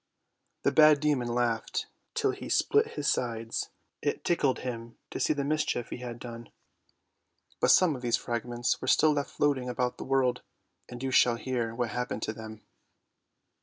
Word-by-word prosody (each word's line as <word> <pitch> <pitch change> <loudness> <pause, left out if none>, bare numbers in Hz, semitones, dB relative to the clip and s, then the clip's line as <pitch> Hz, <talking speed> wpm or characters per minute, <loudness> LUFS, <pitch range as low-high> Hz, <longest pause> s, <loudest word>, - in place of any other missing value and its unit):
The - - +3
bad 155 -1 +7
demon 145 -5 +1
laughed 120 -1 -1 0.3
till 430 -3 +2
he - - -8
split 435 +1 +2
his 145 -2 -2
sides; 115 -3 -1 0.3
it - - -2
tickled 145 -6 +1
him 115 -2 -6
to - - -4
see - - +2
the 145 -2 0
mischief 145 -4 -1
he - - -4
had 120 -1 -6
done. 120 -1 -9 1.1
But - - +3
some 175 -5 +5
of 125 - -8
these 120 -2 +1
fragments 120 +1 -2
were - - -5
still 155 0 +5
left 145 -1 -2
floating 135 -4 0
about 125 0 -2
the - - -4
world, 135 -2 +1 0.5
and 125 +1 -8
you 135 - -1
shall 125 -1 +5
hear 120 -2 -3
what 120 -1 -1
happened 125 0 -3
to 110 - -2
them. 110 0 -10
125 Hz, 170 wpm, -29 LUFS, 120-145 Hz, 1.1 s, bad